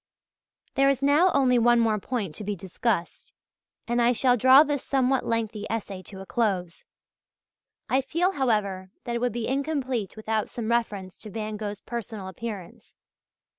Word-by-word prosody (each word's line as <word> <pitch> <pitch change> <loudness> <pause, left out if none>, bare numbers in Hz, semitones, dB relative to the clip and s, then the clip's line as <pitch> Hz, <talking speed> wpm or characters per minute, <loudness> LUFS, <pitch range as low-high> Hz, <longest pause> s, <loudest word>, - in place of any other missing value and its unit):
There 275 0 +4
is 275 -1 0
now 295 +6 +5
only 255 -3 +3
one 240 +1 +5
more 220 -2 +2
point 205 -6 -3
to 210 - -7
be 205 0 -2
discussed, 190 0 -3 0.6
and 240 +1 +1
I 240 +1 +4
shall 250 +1 +3
draw 260 +4 +7
this 290 -3 -2
somewhat 265 -1 +1
lengthy 220 -2 -2
essay 200 -4 -4
to 190 -2 -9
a - - -8
close. 190 -7 -1 1.0
I 265 - +2
feel, 335 +7 0
however, 210 - 0
that 240 - -4
it 235 - 0
would 245 0 +1
be 230 0 -3
incomplete 265 - -2
without 220 0 -2
some 235 -1 -3
reference 205 -6 -1
to 215 - -10
Van 215 0 -4
Gogh's 210 -1 -5
personal 220 -5 -6
appearance. 195 -2 -8
230 Hz, 165 wpm, -26 LUFS, 205-260 Hz, 1.0 s, draw